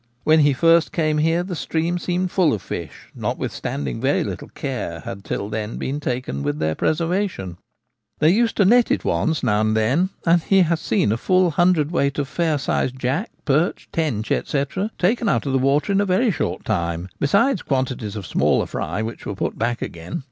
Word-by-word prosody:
When 155 +1 +5
he 145 -1 +5
first 165 +3 +4
came 155 -5 +1
here 165 +3 +2
the 180 -1 -5
stream 165 +3 -1
seemed 180 +1 -1
full 175 -6 +3
of 105 - -4
fish, 80 -5 -7
notwithstanding 70 -3 -3
very - - +2
little - - -5
care - - -5
had 100 0 -7
till 100 - -3
then 105 +1 -4
been 140 +3 -3
taken 125 - -3
with 75 +1 -2
their 80 0 0
preservation. 165 - -1 0.6
They 155 - +4
used 230 +4 +2
to 200 - +4
net 240 +4 +5
it - - 0
once 160 -2 0
now 105 0 +2
and 110 0 +1
then, 135 +13 +2 0.2
and 170 0 +4
he 195 +3 +3
has 165 -1 0
seen 180 - +1
a 110 - +1
full 185 +6 +2
hundredweight 155 -4 +2
of 145 -2 -1
fair 160 0 0
sized 130 -2 -1
jack, 130 - -1 0.2
perch, 155 +5 0
tench, 135 -10 -1
&c, 140 -1 0 0.3
taken 220 +4 +1
out - - +1
of 140 - -1
the 135 - +3
water 140 +8 +2
in 200 0 +3
a - - +1
very 205 +6 +3
short 90 - -3
time, 85 -4 -1
besides 200 - +2
quantities 130 -6 -2
of 105 -3 -5
smaller - - +2
fry 110 - -3
which 115 +1 -6
were 100 - -3
put - - -2
back 120 +2 -1
again. 85 +1 -6
150 Hz, 195 wpm, -22 LUFS, 110-175 Hz, 0.6 s, When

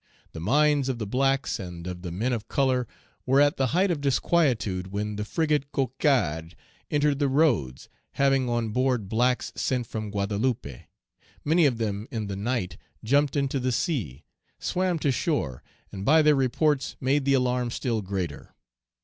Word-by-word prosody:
The - - -8
minds 140 - +2
of 130 - -1
the 110 - -3
blacks 135 +5 0
and 90 -3 -7
of 90 -1 -6
the 90 -2 -6
men 115 +9 -1
of 110 -3 -4
color 130 -4 +1 0.4
were 135 +2 +4
at 145 +3 +4
the 135 - +2
height 180 +8 +2
of 155 -4 -2
disquietude 125 - +1
when 105 +1 -3
the 105 - -3
frigate 150 +3 0
Cocarde 125 - 0 0.3
entered 145 -1 +1
the 145 - +2
roads, 130 - +1 0.3
having 135 -2 +2
on 120 -1 0
board 125 -2 0
blacks 125 +4 +1
sent 125 -2 -1
from 110 -1 -5
Guadeloupe; 100 - -2 0.6
many 160 +1 +4
of 125 -4 -1
them 105 -1 -3
in 110 -3 -3
the 100 -1 -4
night 110 -1 -2 0.3
jumped 140 +5 +2
into 140 -1 0
the 130 0 0
sea, 110 - -2 0.3
swam 180 -1 -1
to 145 -3 +1
shore, 125 - -1 0.3
and 95 - -6
by 155 +7 +5
their 150 0 +5
reports 135 +1 +1
made 135 +2 +1
the 140 0 +3
alarm 125 -1 +1
still 115 -2 -2
greater. 95 -6 -5
125 Hz, 165 wpm, -26 LUFS, 105-140 Hz, 0.6 s, by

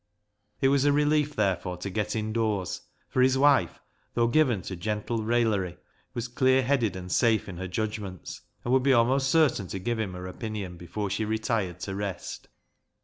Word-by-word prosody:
It 135 - +4
was 140 -1 +3
a 145 - +4
relief, 150 0 +2
therefore, 95 -3 0
to 90 +3 -5
get 105 +3 -2
indoors, 110 -4 -1 0.3
for 130 - 0
his 130 +1 +4
wife, 135 - +3 0.4
though 120 - +3
given 120 - +2
to 95 - -5
gentle 105 +5 -2
raillery, 110 -6 +1 0.4
was 120 -1 -2
clear 130 +2 +3
headed 125 -6 +1
and 90 -1 -7
safe 115 -3 +3
in 95 -3 -7
her 95 +1 -4
judgments, 100 -3 -4 0.2
and 120 - +1
would 130 - +5
be 135 +1 +4
almost 130 +3 +3
certain 135 - +3
to 95 - -5
give 115 +4 -2
him 100 -4 -2
her 90 0 -7
opinion 100 -1 -5
before 95 +4 -4
she 100 +2 -1
retired 110 -4 -1
to 95 - -4
rest. 100 -2 -5
110 Hz, 180 wpm, -27 LUFS, 95-130 Hz, 0.4 s, would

